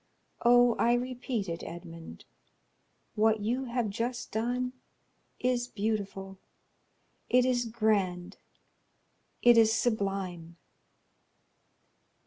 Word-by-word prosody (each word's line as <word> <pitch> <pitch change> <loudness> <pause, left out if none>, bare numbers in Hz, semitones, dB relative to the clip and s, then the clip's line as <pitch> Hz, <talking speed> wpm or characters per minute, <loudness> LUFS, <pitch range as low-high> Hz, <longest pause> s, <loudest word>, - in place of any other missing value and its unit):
Oh, 245 0 +6
I 235 - +4
repeat 245 -3 -3
it, 165 -1 -4
Edmond; 165 -1 -10 0.9
what 220 0 +2
you 245 +5 -1
have 235 -3 -2
just 240 +4 -4
done 245 +3 -1 0.7
is 245 -1 0
beautiful—it 200 -3 -4 1.1
is 245 -1 +1
grand; 205 -6 -1 1.1
it 240 -1 +7
is 220 -1 +5
sublime." 195 -7 -2
220 Hz, 85 wpm, -29 LUFS, 195-245 Hz, 1.1 s, it